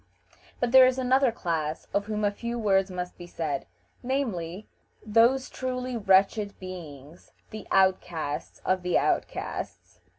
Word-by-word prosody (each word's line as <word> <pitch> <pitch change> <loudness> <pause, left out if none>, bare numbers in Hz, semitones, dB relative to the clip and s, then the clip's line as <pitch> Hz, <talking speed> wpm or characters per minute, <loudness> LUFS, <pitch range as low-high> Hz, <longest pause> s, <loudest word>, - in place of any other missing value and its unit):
But 245 -1 0
there 260 0 +9
is 255 0 0
another 260 0 +3
class 160 -7 -3
of 200 0 +1
whom 215 0 -2
a 205 - +2
few 235 +3 -5
words 195 -3 +2
must 180 -1 -6
be 175 - -9
said, 155 -5 -3 0.3
namely, 215 -8 -3 0.4
those 235 +5 +4
truly 255 -1 -4
wretched 200 0 +2
beings, 165 -4 -10 0.2
the 215 -2 -8
outcasts 180 -6 0
of 185 0 +1
the 180 -1 +1
outcasts. - - -3
200 Hz, 135 wpm, -27 LUFS, 180-240 Hz, 0.4 s, there